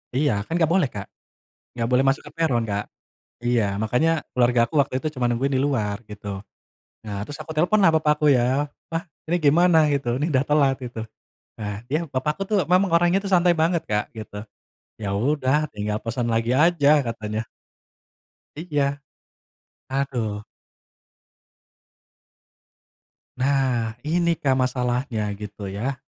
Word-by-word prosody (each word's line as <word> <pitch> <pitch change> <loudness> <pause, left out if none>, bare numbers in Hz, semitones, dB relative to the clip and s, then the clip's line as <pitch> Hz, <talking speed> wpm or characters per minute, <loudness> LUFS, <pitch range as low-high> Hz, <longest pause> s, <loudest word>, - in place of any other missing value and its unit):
Iya, 145 +1 +2
kan 165 - -7
nggak 165 - +4
boleh, 185 -6 +3
Kak. 100 -1 -7 0.7
Nggak 115 -1 -2
boleh 125 +1 +4
masuk 135 0 +2
ke - - -18
peron, 155 -8 +2
Kak. 100 0 -2 0.6
Iya. 120 -2 +2
Makanya, 125 +9 +1 0.2
keluargaku 120 +1 +2
waktu 140 - -4
itu 155 - -3
cuman 125 -1 0
nungguin 135 +3 0
di 130 - +2
luar, 105 -8 -1
gitu. 100 -2 -6 0.6
Nah, 100 -1 -4
terus 145 - -8
aku 160 +1 -8
teleponlah 180 +3 +4
bapakku, 150 0 +2
ya, 130 +3 +2 0.2
"Pa, 165 +1 -3 0.2
ini 175 - +2
gimana?" 160 +1 +4
gitu, 125 -4 -1
"Ini 150 +3 -1
dah 130 0 +3
telat," 140 -3 +4
gitu. 120 -3 -6 0.5
Nah, 105 -1 -5
yah, 155 +4 +1
papaku 150 +6 -2
tuh, 210 0 +1
memang 185 +1 +4
orangnya 175 +2 +4
tuh 195 - -3
santai 175 -1 +5
banget 170 0 +2
Kak, 105 +3 -1
gitu. 110 -1 -8 0.5
"Ya 100 -2 -3
udah, 140 +5 +1
tinggal 105 0 -2
pesan 115 +1 -2
lagi 115 +1 +1
aja," 150 -1 +4
katanya. 110 -3 -4 1.1
Iya. 145 -3 -1 0.9
Aduh. 120 -6 -2 2.9
Nah, 130 -4 +1
ini 170 +2 +1
Kak, 135 -3 +1
masalahnya, 125 -3 -1
gitu 105 -1 -7
ya. 120 +8 -2
130 Hz, 140 wpm, -23 LUFS, 115-155 Hz, 2.9 s, santai